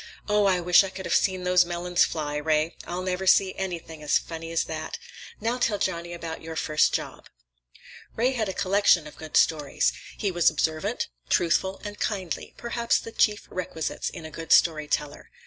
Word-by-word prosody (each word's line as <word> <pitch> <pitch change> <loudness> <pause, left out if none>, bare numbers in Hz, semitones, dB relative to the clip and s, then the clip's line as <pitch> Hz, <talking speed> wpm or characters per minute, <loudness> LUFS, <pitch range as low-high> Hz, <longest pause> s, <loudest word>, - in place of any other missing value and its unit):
"Oh, 210 -1 +3
I 185 -2 +3
wish 175 +2 +6
I 195 - -4
could 190 0 -8
have 170 - -1
seen 185 -2 +2
those 180 0 +5
melons 175 0 +1
fly, 150 -2 -3
Ray! 155 +2 0
I'll 180 +1 -3
never 185 +1 -2
see 190 0 +5
anything 170 -4 -5
as 150 -1 +3
funny 165 0 -7
as 165 - +1
that. 160 0 -5 0.4
Now, 230 +3 -1
tell 225 -4 +1
Johnny 170 -3 -2
about 165 -1 -6
your 160 0 -7
first 155 -1 +2
job." - - -4 0.9
Ray 245 +3 +2
had 225 -6 -1
a - - -3
collection 190 -4 +3
of 150 - -11
good 155 -1 -3
stories. 150 -1 +2 0.2
He 200 - -1
was 175 -2 +4
observant, 160 +7 -1 0.2
truthful, 185 +2 +1
and 205 0 -7
kindly—perhaps 230 +4 -1
the 230 - -7
chief 210 -2 +1
requisites 170 -3 -3
in 160 - -9
a 155 - -8
good 165 +1 -7
story 155 -3 +4
teller. 145 -1 -3
175 Hz, 180 wpm, -26 LUFS, 160-195 Hz, 0.9 s, wish